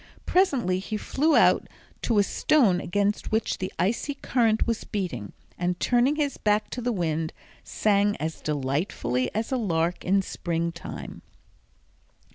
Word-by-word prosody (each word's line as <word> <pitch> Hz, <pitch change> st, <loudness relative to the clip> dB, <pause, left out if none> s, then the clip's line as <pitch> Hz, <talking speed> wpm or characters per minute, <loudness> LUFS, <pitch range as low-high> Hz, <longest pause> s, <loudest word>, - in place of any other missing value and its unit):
Presently 260 Hz, -, +2 dB
he 215 Hz, +3 st, -4 dB
flew 300 Hz, +8 st, +1 dB
out -, -, +4 dB, 0.3 s
to 230 Hz, -, +1 dB
a 205 Hz, -, +6 dB
stone 200 Hz, -3 st, +3 dB
against 205 Hz, +3 st, -1 dB
which 220 Hz, 0 st, 0 dB
the 185 Hz, -, -3 dB
icy 235 Hz, +8 st, 0 dB
current 230 Hz, -5 st, +1 dB
was 230 Hz, -2 st, -1 dB
beating, 175 Hz, -, -4 dB, 0.3 s
and 180 Hz, 0 st, -1 dB
turning 250 Hz, +4 st, +3 dB
his 290 Hz, -2 st, -1 dB
back 210 Hz, 0 st, +1 dB
to 250 Hz, -, -4 dB
the 245 Hz, +1 st, 0 dB
wind, 160 Hz, -5 st, -1 dB, 0.3 s
sang 205 Hz, -1 st, +2 dB
as 160 Hz, +1 st, -4 dB
delightfully 135 Hz, -3 st, -1 dB
as 220 Hz, +3 st, -2 dB
a 260 Hz, -, +1 dB
lark 170 Hz, -6 st, 0 dB
in 195 Hz, +1 st, +2 dB
springtime. 170 Hz, -1 st, -4 dB
200 Hz, 140 wpm, -26 LUFS, 170-235 Hz, 0.3 s, a